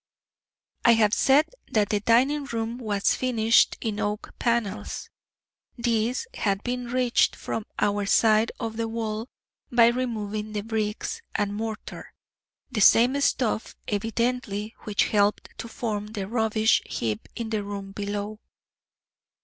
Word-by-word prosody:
I 235 - +7
have 215 -2 +3
said 285 +6 +4 0.2
that 210 -2 +2
the 210 - +1
dining 260 +7 +3
room 230 -1 -3
was 205 -4 +1
finished 230 -3 +3
in 215 -2 -2
oak 210 0 -3
panels. 235 -4 -2 0.7
These 235 - 0
had 200 -1 -1
been 245 0 -3
reached 250 0 +2
from 220 - -4
our 205 -1 +1
side 220 +1 +4
of 225 -1 -4
the 230 0 -1
wall 225 +1 -3 0.4
by 235 -1 +6
removing 215 -4 -3
the 210 - -1
bricks 220 - -3
and 205 0 0
mortar 220 +1 -6 0.6
the 215 - -1
same 245 +7 +6
stuff 240 -5 0
evidently 225 0 -1
which 210 -2 +2
helped 205 -1 +2
to - - -5
form 215 -3 -3
the 210 -3 -5
rubbish 220 0 +2
heap 110 -2 -3
in 230 -2 -4
the 215 -2 -1
room 200 -1 -6
below. 205 +1 -4
220 Hz, 135 wpm, -26 LUFS, 210-235 Hz, 0.7 s, I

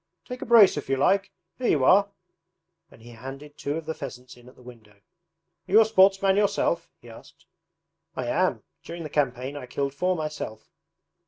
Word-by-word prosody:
'Take 250 0 -8
a - - -6
brace 220 -8 +6
if 145 - -6
you 135 - +1
like! 195 +7 +1 0.3
Here 250 - -1
you 140 - +2
are,' 200 +5 +5 0.8
and 115 - -19
he 120 - -13
handed 135 +5 -10
two 145 +1 -4
of 165 - -7
the 160 - -3
pheasants 125 -4 -9
in 120 0 -17
at 125 - -20
the 125 - -19
window. 115 -4 -15
'Are 165 - -24
you 215 - +7
a 225 - +6
sportsman 195 -2 +3
yourself?' 170 -4 0
he 120 - -18
asked. 115 - -15 0.7
'I - - -3
am. - - 0 0.2
During 170 0 -8
the 155 - -8
campaign 135 -1 -1
I 135 -3 -8
killed 140 +2 -3
four 180 +5 0
myself.' 150 -9 -6
150 Hz, 190 wpm, -25 LUFS, 125-190 Hz, 0.8 s, you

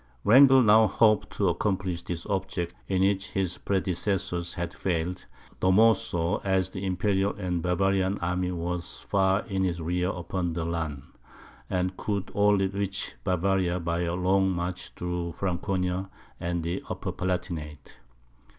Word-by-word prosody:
Wrangel 130 +3 +7
now 110 0 +6
hoped 105 +1 +3
to 100 - +1
accomplish 95 -1 -1
the 85 - -4
object 95 -3 -2
in 95 -1 +1
which 95 0 +1
his 95 -2 -2
predecessors 95 -2 -1
had 85 -1 -4
failed, 90 0 -2 0.4
the 95 - +2
more 110 +4 +6
so, 85 -4 -1
as 95 -1 0
the 95 0 -6
Imperial 95 +1 0
and 90 -4 -2
Bavarian 95 +2 +1
army 90 +1 -1
was 85 0 -4
far 95 +1 +1
in 95 -4 -1
his 85 -2 -1
rear 90 +2 -1
upon 90 -1 -3
the 80 0 -2
Lahn, 80 -5 -3 0.7
and 90 0 -1
could 100 -3 -3
only 105 -1 +3
reach 100 0 -3
Bavaria 90 -1 +1
by 85 0 -1
a 85 0 -1
long 95 +1 +2
march 90 0 -3
through 90 -1 -3
Franconia 90 +1 -2 0.3
and 85 -1 -2
the 85 +1 -2
Upper - - -3
Palatinate. 85 -7 -4
90 Hz, 145 wpm, -27 LUFS, 85-95 Hz, 0.7 s, Wrangel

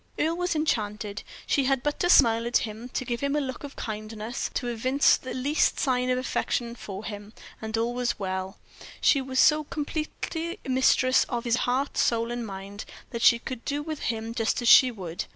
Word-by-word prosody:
Earle 320 +2 +1
was 355 -1 -1
enchanted; 210 -8 -1 0.2
she 275 - +1
had 270 -1 +1
but 295 0 -1
to 355 - +1
smile 230 -7 +5
at 240 - +3
him, 220 +3 -8
to 255 - -3
give 235 -1 -2
him 280 +1 -1
a - - +2
look 260 -2 -5
of 285 -1 -8
kindness, 215 +2 -5
to 245 - -2
evince 255 +4 +3
the 255 - -7
least 280 +4 +1
sign 255 -2 +1
of 250 - +2
affection 240 -2 -2
for 205 -3 -8
him, 205 0 -7 0.3
and 220 0 -3
all 230 +2 0
was 245 0 -1
well; 190 0 -4 0.4
she 280 - +4
was 260 0 -2
so 305 0 +5
completely 320 +4 -4
mistress 255 0 +4
of 240 -2 -3
his 240 -1 +1
heart, 265 +3 0
soul, 230 0 +1
and 240 -1 -4
mind, 195 +1 -7 0.3
that 235 - -4
she 235 - +6
could 240 0 -7
do 290 0 -2
with 310 -1 -5
him 225 0 -3
just 225 -1 0
as 240 - -2
she 255 +2 +8
would. 180 -8 -6
245 Hz, 200 wpm, -26 LUFS, 220-275 Hz, 0.4 s, she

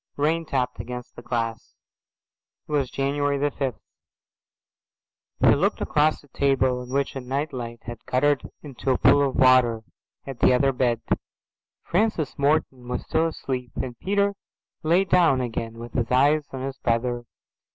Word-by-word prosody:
Rain 160 +3 +1
tapped 125 -3 -1
against 125 0 -7
the - - -9
glass. 115 -2 -3 0.9
It - - -11
was 140 -4 +1
January 140 +2 0
the 145 +1 0
fifth. 130 -4 -3 1.6
He - - +7
looked - - +1
across 150 +1 +1
a - - -20
table 130 -2 +1
on 125 - -9
which 140 +2 -1
a 135 - -4
night 140 +4 -3
light 120 -2 -6
had 120 -1 -8
guttered 145 +2 +1
into 135 -2 -5
a 130 - +3
pool 140 +1 +5
of - - -7
water, 125 -3 +4 0.4
at 135 -3 -7
the - - +5
other 135 +2 +3
bed. 125 -3 0 0.8
Francis 175 - 0
Morton 140 -3 +1
was 125 - -3
still 160 +1 +1
asleep, 130 -6 -5
and 125 -2 -4
Peter 200 +1 +1 0.5
lay 170 +5 +3
down 170 -8 +4
again 115 -2 -4
with 120 0 -9
his 120 -3 -1
eyes 145 +3 +3
on 130 - -6
his 135 0 -5
brother. 120 0 -1
130 Hz, 160 wpm, -24 LUFS, 125-145 Hz, 1.6 s, He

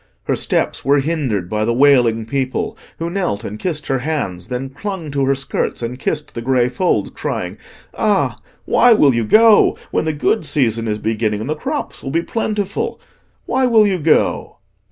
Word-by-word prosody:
Her - - 0
steps - - -1
were 140 +2 +3
hindered 135 - -1
by 105 +3 -1
the 115 +2 0
wailing 120 -5 +4
people, 130 +1 -2 0.2
who 165 - -3
knelt 175 - -2
and 105 +1 -6
kissed 165 -5 -3
her 135 -1 0
hands, 125 - -3
then 130 +2 -4
clung 170 +1 -5
to 140 -1 0
her 135 +1 +2
skirts 135 -2 -3
and 125 +2 -4
kissed 150 +2 -3
the 115 - -5
grey 125 0 +2
folds, 175 +9 0
crying, - - -4 0.3
"Ah, - - +1 0.3
why 245 -1 +5
will 145 - +4
you 115 0 0
go, 220 - +5
when - - 0
the 160 - 0
good 165 +8 0
season 115 -7 0
is 105 -1 -1
beginning 110 -1 -1
and 110 +6 -5
the - - 0
crops 285 - -4
will 135 - -5
be 165 +4 0
plentiful? 210 -2 -2 0.5
Why 260 0 +1
will 225 -3 +5
you 190 -3 0
go?" 155 0 +1
140 Hz, 185 wpm, -18 LUFS, 115-170 Hz, 0.5 s, why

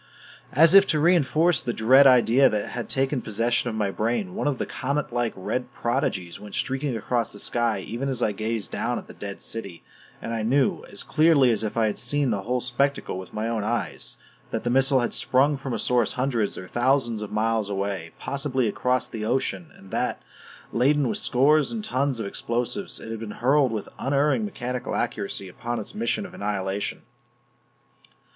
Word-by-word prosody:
As 160 +5 +6
if 195 0 +8
to 155 - +2
reinforce 165 0 +3
the 120 - -2
dread 130 +5 +6
idea 125 +1 +5
that 105 -1 -2
had 120 -1 -5
taken 135 0 +1
possession 115 +3 0
of 110 - -4
my 105 -3 0
brain, 120 - -1
one 200 - -2
of 140 -3 0
the - - -2
comet 140 -1 -3
like 120 -1 0
red 125 +7 -3
prodigies 100 -8 -2
went 105 -1 -9
streaking 135 -2 -1
across 115 +1 -1
the 105 - -7
sky 120 -1 +1
even 130 +4 -3
as 125 -3 0
I 105 - +2
gazed 110 -1 -2
down - - -1
at - - -7
the - - -11
dead 100 -1 -8
city; 100 -7 -6 0.4
and 115 - -5
I 115 - -1
knew 140 - +1
as - - -2
clearly 155 -5 +4
as 110 -1 0
if 110 +1 -3
I 115 - +3
had 105 - -1
seen 140 +1 0
the 100 -2 -1
whole 125 +4 -1
spectacle 125 -4 -1
with 95 - -9
my 110 +1 -3
own 115 -2 -1
eyes 115 0 -2 0.3
that - - -3
the 120 - 0
missile 135 0 +4
had 120 - -1
sprung 140 +3 +2
from 135 -1 -6
a 115 - -1
source 120 +1 +2
hundreds 125 -5 -1
or 95 - -7
thousands 120 -2 +1
of 105 - -6
miles 110 -1 0
away, 100 -4 -3
possibly 135 -3 -1
across 125 +3 0
the 110 -2 -6
ocean; 135 +8 -1
and 95 - -15
that, - - -1 0.5
laden 135 +2 +2
with - - -1
scores 145 +4 +3
of 225 -2 -4
tons 140 - 0
of 110 - -3
explosives, 120 - -2
it 110 - -8
had 115 - -5
been 115 -1 -6
hurled 135 +1 +3
with 110 -3 -4
unerring 145 - +1
mechanical 125 - -4
accuracy 105 -4 -2
upon 120 +6 -4
its 105 - -7
mission 215 -1 -1
of - - -11
annihilation. 100 -1 -3
120 Hz, 195 wpm, -25 LUFS, 110-140 Hz, 0.5 s, if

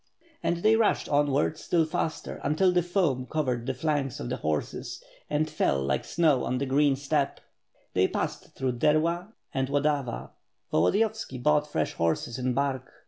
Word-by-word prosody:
And 170 0 -1
they 220 +1 +6
rushed 225 -1 +2
onward 145 +1 +2
still 165 -2 +2
faster 160 0 -3
until 180 +5 +3
the 180 0 +3
foam 165 -8 0
covered 130 -6 -1
the 135 - 0
flanks 145 -1 -1
of - - -4
the - - -2
horses 75 -1 -3 0.3
and 150 +1 +1
fell 150 - +1
like 70 -1 -1
snow 155 -6 +2
on 125 - -1
the 140 - -1
green 140 +1 +3
steppe. 140 +1 -1 0.5
They - - +3
passed - - -4
through 130 -2 -2
Derla 170 - +1 0.2
and 135 -1 0
Tx)dava. 140 - -1 0.4
Volodi 90 - +3
•yovski 220 - -2
bought 150 0 +3
fresh - - -1
horses 85 +9 -1
in 125 -1 0
Bark. 135 -2 -1
145 Hz, 165 wpm, -27 LUFS, 130-155 Hz, 0.5 s, they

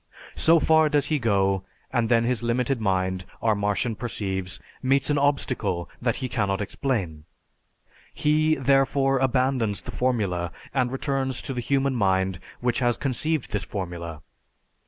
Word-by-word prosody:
So 165 +1 +5
far 160 0 +4
does 145 -2 +2
he 150 - +2
go, 100 -4 +1 0.3
and 120 -3 +1
then 115 -1 +4
his 120 -1 0
limited 120 +1 0
mind, 95 -2 0 0.2
our 110 -1 +2
Martian 105 +3 0
perceives, 95 -5 -3 0.2
meets 135 +2 +2
an 145 - +2
obstacle 125 -11 0
that 120 -2 +1
he 130 - -3
cannot 100 -6 -1
explain. 100 - -2 0.9
He, 155 +1 +2
therefore, 135 0 +2
abandons 125 -6 +1
the - - -8
formula 100 -9 -1 0.2
and 125 -2 +1
returns 135 -1 -1
to 135 - -4
the 125 - -3
human 135 +1 +1
mind 95 -3 +1 0.2
which 120 -1 +1
has 120 -2 +1
conceived 150 +2 -1
this 105 -2 -1
formula. 85 -4 -6
120 Hz, 145 wpm, -25 LUFS, 95-135 Hz, 0.9 s, So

